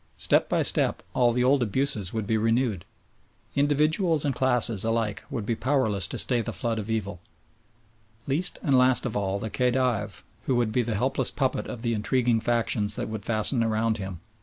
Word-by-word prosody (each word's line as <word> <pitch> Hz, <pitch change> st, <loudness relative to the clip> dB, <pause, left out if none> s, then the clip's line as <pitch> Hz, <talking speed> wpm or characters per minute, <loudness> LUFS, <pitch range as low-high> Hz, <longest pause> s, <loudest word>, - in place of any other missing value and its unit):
Step -, -, +2 dB
by -, -, +1 dB
step -, -, +2 dB
all 120 Hz, -1 st, +3 dB
the 125 Hz, +1 st, 0 dB
old 135 Hz, +1 st, +3 dB
abuses 115 Hz, -4 st, 0 dB
would 110 Hz, -2 st, -3 dB
be 110 Hz, -, 0 dB
renewed. 115 Hz, -3 st, 0 dB, 0.7 s
Individuals 150 Hz, +3 st, +1 dB
and 140 Hz, -, 0 dB
classes 120 Hz, -5 st, +2 dB
alike 115 Hz, -2 st, -1 dB
would 110 Hz, -4 st, -4 dB
be 115 Hz, -, -1 dB
powerless 110 Hz, -8 st, 0 dB
to -, -, -5 dB
stay 125 Hz, -2 st, +3 dB
the -, -, -4 dB
flood 115 Hz, -2 st, -2 dB
of 105 Hz, +1 st, -6 dB
evil. 100 Hz, -5 st, -3 dB, 1.1 s
Least 150 Hz, +7 st, -1 dB
and 140 Hz, -5 st, +2 dB
last 125 Hz, 0 st, +3 dB
of 120 Hz, -, -3 dB
all 100 Hz, -1 st, -1 dB
the 110 Hz, +1 st, -5 dB
Khedive, 120 Hz, -, -1 dB, 0.2 s
who 130 Hz, -, +1 dB
would 120 Hz, -2 st, +1 dB
be 125 Hz, -, +1 dB
the 115 Hz, -2 st, -2 dB
helpless 130 Hz, +3 st, 0 dB
puppet 130 Hz, -2 st, -2 dB
of 120 Hz, -1 st, -7 dB
the 115 Hz, -1 st, 0 dB
intriguing 115 Hz, +2 st, +1 dB
factions 110 Hz, -3 st, 0 dB
that -, -, -4 dB
would 110 Hz, -2 st, -6 dB
fasten 115 Hz, +2 st, +1 dB
around 110 Hz, 0 st, 0 dB
him. 95 Hz, -3 st, -7 dB
115 Hz, 185 wpm, -26 LUFS, 110-130 Hz, 1.1 s, all